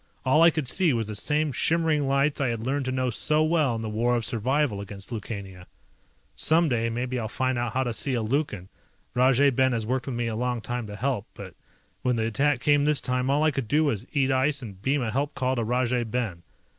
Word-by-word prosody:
All 130 +5 +4
I 165 - +8
could 155 -4 -2
see 170 +2 +4
was 115 -3 -1
the - - -4
same 150 +8 +1
shimmering 155 +1 +1
lights 140 +2 +1
I 135 - +1
had 115 -2 -3
learned 135 +2 -1
to 130 - -2
know 130 -1 -1
so 150 +7 +2
well 155 -6 +1
in 115 - -4
the - - -3
War 120 +3 +1
of 115 -2 -1
Survival 120 -1 0
against 100 +1 -8
Lukania. 100 -5 -7 0.7
Someday 120 - +2
maybe 125 +2 -3
I'll 110 - -3
find 130 +3 -1
out 120 -2 -2
how 130 - +1
to 120 -2 -3
see 130 +3 0
a 115 - -1
Lukan, 110 - -2 0.5
Rajay 130 +2 +4
Ben 130 0 +2
has 115 -2 -2
worked 130 +4 -2
with 130 - -3
me 120 0 -1
a 115 -1 -2
long 125 +1 -1
time 120 0 -4
to 105 - -8
help, 120 -2 -2
but - - -9 0.5
when 125 -1 +1
the 110 -1 -1
attack 135 +4 +1
came 145 +1 +3
this 150 -1 +3
time 125 0 -1
all 145 +2 +2
I 155 - +3
could 135 -4 -3
do 150 +6 +2
was 120 -5 -1
eat 135 -2 +1
ice 135 +1 +1
and 100 -5 -10
beam 135 +3 0
a 110 - -2
help 140 +5 -2
call 130 -1 0
to 120 - -1
Rajay 125 +1 0
Ben. 110 -7 -3
125 Hz, 235 wpm, -26 LUFS, 115-140 Hz, 0.7 s, I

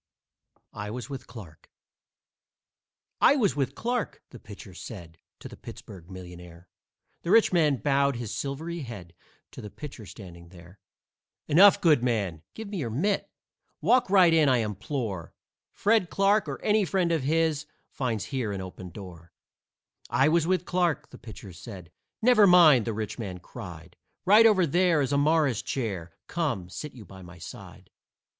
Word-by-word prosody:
I 105 -1 -6
WAS 125 +5 -7
WITH 135 -2 -7
CLARKE 90 -10 -13 1.5
"I 280 - +6
was 210 - +1
with 135 -2 -2
Clarke," 240 -1 -3
the 125 - -11
pitcher 100 -2 -12
said 85 -4 -10 0.2
To - - -8
the - - -11
Pittsburg 90 -4 -12
millionaire. 90 -2 -11 0.5
The 170 - -6
rich 220 -1 +5
man 155 -5 +3
bowed 140 +3 +1
his 120 -3 -5
silvery 160 +5 -4
head 110 - -9 0.4
To - - -10
the 105 - -8
pitcher 130 -4 -10
standing 85 -3 -12
there. 90 +2 -16 0.7
"Enough, 190 +7 +6
good 155 -7 +4
man! 100 -10 -1
Give 220 -1 -7
me 200 -1 -5
your 130 -9 -3
mitt! 190 - -1 0.5
Walk 250 -5 +3
right 185 -4 +5
in, 155 -3 +4
I 130 - +4
implore. 110 - -4 0.4
Fred 210 -4 +1
Clarke 200 +2 +2
or - - -5
any 210 0 +3
friend 185 -2 0
of 165 -3 +1
his 155 +1 0 0.2
Finds 115 -6 -3
here 130 -7 -3
an 100 - -4
open 95 0 -8
door." 85 -3 -12 0.8
"I 135 +3 +3
was 165 0 +2
with 180 -1 0
Clarke," 175 -4 -1
the - - -13
pitcher 105 -4 -11
said. 90 -2 -11 0.3
"Never 225 -4 +6
mind," 160 - +6
the 115 - -2
rich 110 +2 -5
man 95 -5 -5
cried. 90 -4 -11 0.3
"Right 215 +4 +7
over 195 -5 +4
there 170 0 +2
is 135 +1 -2
a - - +3
Morris 150 -5 +2
chair 95 -10 -4
Come, 130 - -3
sit 140 - -7
you 115 -5 -12
by 95 +1 -13
my 90 0 -13
side. 80 - -12
130 Hz, 165 wpm, -27 LUFS, -, 1.5 s, Right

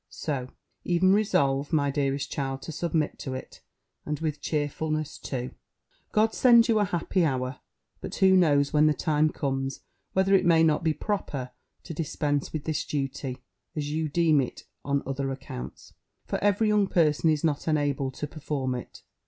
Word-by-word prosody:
So 135 -5 -3 0.4
e'en 180 +2 +3
resolve, 145 -9 +2
my 145 -3 +2
dearest 140 0 -1
child, 135 -1 -3
to - - -6
submit 160 -1 -1
to 130 -2 -4
it, 130 - -9 0.4
and 150 -1 -3
with 155 -2 -3
cheerfulness 155 0 -2
too. 125 -2 -4 0.6
God 220 +1 +3
send 235 -2 +6
you 225 -2 +3
an 205 - +2
happy 175 +1 0
hour! 130 -3 -1 0.4
But - - -6
who 190 0 +5
knows, 145 -6 +3
when 150 0 +5
the 155 - +3
time 155 -2 +2
comes, 135 -3 -3 0.3
whether 190 +1 +3
it 190 -1 +5
may 165 -2 +5
not 160 +1 +2
be 160 -2 +1
proper 140 -11 -3 0.3
to - - -7
dispense 145 -2 -1
with 155 -2 -4
this 155 -1 -1
duty, 135 -2 -4 0.3
as 145 -1 -3
you 155 0 -1
deem 155 -2 +3
it, 125 - -6 0.2
on 140 0 0
other 135 0 -2
accounts? 130 - -8 0.3
For - - -3
every 205 +2 +3
young 210 -2 +3
person 160 -2 +3
is 155 -2 +1
not 155 -2 0
enabled 145 -4 0
to - - -3
perform 145 -4 -3
it. 125 - -8
150 Hz, 170 wpm, -27 LUFS, 140-165 Hz, 0.6 s, send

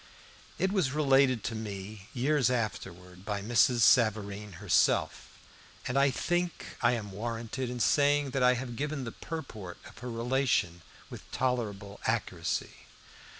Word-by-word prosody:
It 190 - +1
was 180 -10 +1
related 135 -5 +3
to 115 - -2
me 105 -2 -7
years 135 0 +2
afterwards 90 -6 -4
by 100 0 -3
Mrs. 120 +2 +3
Savareen 105 -3 +3
herself, 85 - +1 0.5
and 125 - -2
I 140 0 +5
think 175 +6 -2
I 120 0 +4
am 105 -4 -4
warranted 115 +4 -4
in 125 0 -5
saying 145 +2 +3
that 135 - -1
I 125 0 +5
have 120 -1 -5
given 145 +1 -3
the 115 - -5
purport 110 - -7
of - - -13
her 125 - -6
relation 115 -7 0 0.3
with - - -11
tolerable 105 -6 -2
accuracy. - - -2
120 Hz, 140 wpm, -30 LUFS, 105-135 Hz, 0.5 s, I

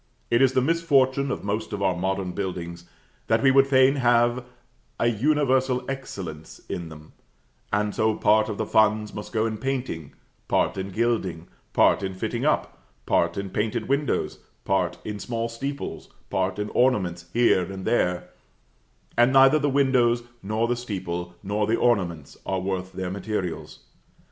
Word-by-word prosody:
It 120 +2 +4
is 130 -1 +4
the 130 - +2
misfortune 140 -4 +2
of - - -3
most 105 +2 -3
of 100 -1 -3
our 95 -2 +2
modern 95 +1 -2
buildings 90 -2 -5 0.4
that 115 0 +2
we 135 - +6
would 135 0 +5
fain 135 +1 +4
have 120 0 +3 0.6
an 120 -3 +1
universal 130 -2 +2
excellence 95 - -7
in 85 -2 -5
them; 75 0 -13 0.6
and 105 0 0
so 110 0 +1
part 110 +1 +3
of 105 - -4
the - - -1
funds 110 -1 +2
must 105 - -7
go 110 -1 +1
in 110 -1 -3
painting, 125 - -3 0.3
part - - +1
in 95 0 -4
gilding, 95 -6 -1 0.2
part - - +4
in 95 -1 -4
fitting 95 - -3
up, - - -1 0.2
part 85 0 +1
in 100 -1 -4
painted 110 +3 -1
windows, 140 +1 0 0.3
part 95 -3 0
in 105 -1 -4
small 115 +1 -3
steeples, 140 +5 -5 0.2
part 95 +1 0
in 105 0 -3
ornaments 95 -9 +1
here 105 -5 +3
and 95 -1 -7
there; 90 -7 0 0.9
and 120 +2 +4
neither 135 +3 +6
the 145 0 +1
windows, 130 -4 +3 0.2
nor 110 +4 -1
the 120 - +1
steeple, 90 -7 -5
nor 105 +1 -1
the 115 +1 +2
ornaments, 85 - 0
are 95 -1 -1
worth 95 0 -3
their 95 -1 -4
materials. 95 -3 -4
110 Hz, 160 wpm, -25 LUFS, 95-125 Hz, 0.9 s, we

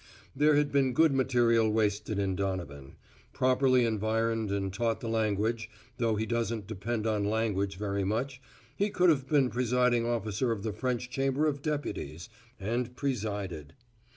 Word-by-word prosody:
There 150 +2 +4
has 145 0 +4
been 140 -3 +1
good 160 +2 +4
material 120 -4 +3
wasted 105 -1 0
in 95 -2 0
Donovan. 90 -8 -4 0.4
Properly 130 -1 +3
environed 110 0 0
and 95 -1 -2
taught 115 +2 0
the 115 - -6
language, 110 0 0 0.3
though 115 -2 +1
he 110 +1 -1
doesn't 115 -2 -2
depend 110 +2 -3
on 105 -2 +1
language 100 -3 -1
very 100 -1 -2
much, 125 +7 -2 0.3
he 205 +6 +1
could 180 -3 +4
have 135 -4 -1
been 140 -4 +3
presiding 125 -1 +2
officer 115 0 -1
of 105 -3 -3
the 110 -2 -2
French 125 +2 -2
Chamber 135 +3 +1
of 145 -2 -1
Deputies 125 - -4 0.3
and 120 +4 -2
presided. 105 - -3
115 Hz, 155 wpm, -30 LUFS, 105-130 Hz, 0.4 s, There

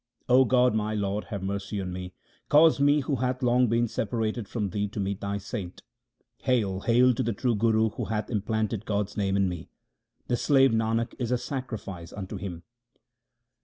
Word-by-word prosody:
O 130 +1 +6
God, 125 0 +3
my 110 0 -1
Lord, 100 0 -2
have 100 -4 -5
mercy 100 +1 -3
on 90 -2 -4
me, 90 0 -7 0.3
cause 155 0 +6
me, 145 +1 +4
who 140 0 -1
hath 125 +1 -1
long 125 +1 +4
been 115 +1 +2
separated 110 0 -2
from 105 -4 -3
Thee, 105 +2 -1
to 105 - -7
meet 100 0 -2
Thy 100 0 -2
saint. 100 -2 -6 0.6
Hail! 110 -8 0
hail 125 +4 +4
to - - -2
the 115 - 0
true 120 +4 0
Guru 110 +1 +2
who - - -5
hath 105 +1 -3
implanted 110 0 -1
God's 105 -1 -1
name 100 -1 0
in 100 -1 +3
me! 90 -3 -6 0.6
The 120 - 0
slave 135 -2 +4
Nanak 115 +1 0
is 120 -3 -2
a 125 - +2
sacrifice 110 - -6
unto 95 -2 -6
him. 85 -4 -6
110 Hz, 185 wpm, -27 LUFS, 100-125 Hz, 0.6 s, O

